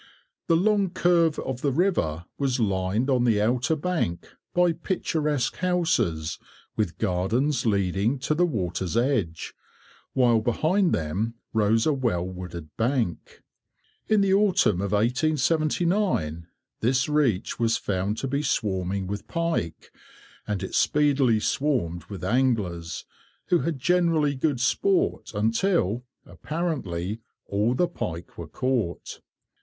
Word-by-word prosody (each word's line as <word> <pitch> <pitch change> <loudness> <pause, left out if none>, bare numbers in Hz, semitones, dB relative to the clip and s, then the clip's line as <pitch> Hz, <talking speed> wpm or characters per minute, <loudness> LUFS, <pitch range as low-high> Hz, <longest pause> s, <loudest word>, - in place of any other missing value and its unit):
The 165 - +4
long 200 +2 +2
curve 170 -3 +2
of 130 -1 -4
the 140 - +1
river 130 - 0
was 135 -3 0
lined 100 +2 0
on 130 -3 +2
the 115 -4 +3
outer 125 +7 +1
bank 155 - -2 0.2
by 175 -1 +3
picturesque 150 - -1
houses, 165 - 0 0.4
with 105 -6 -1
gardens 115 +9 0
leading 100 +4 +1
to 150 - 0
the 175 +3 +2
water's 95 - -2
edge, 115 - 0 0.6
while 120 -3 +4
behind 165 - +1
them 95 +9 -1 0.2
rose 110 +1 +2
a 155 - +3
well 115 -10 0
wooded 90 -4 -8
bank. 115 -6 -2 0.6
In 215 -2 +3
the 195 -1 +3
autumn 195 - +3
of 100 -1 -2
1879 155 - +1 0.3
this 130 +5 +1
reach 145 -10 +1
was 115 -1 +2
found 100 -2 -2
to 135 - -3
be 140 +2 -1
swarming 95 -7 -1
with 100 +2 -5
pike, 165 - -2 0.6
and 100 -2 -2
it 95 - -5
speedily 140 -6 +3
swarmed 105 - -1
with 95 -1 -8
anglers, 100 -11 0 0.4
who 175 - +4
had 155 +2 -2
generally 165 -1 +2
good 140 -1 0
sport 380 - +1
until, 115 - +1 0.2
apparently, 115 - -3 0.2
all 105 +5 0
the 175 +7 +2
pike 90 - -6
were 85 - -7
caught. 125 - -2
120 Hz, 125 wpm, -25 LUFS, 95-155 Hz, 0.6 s, The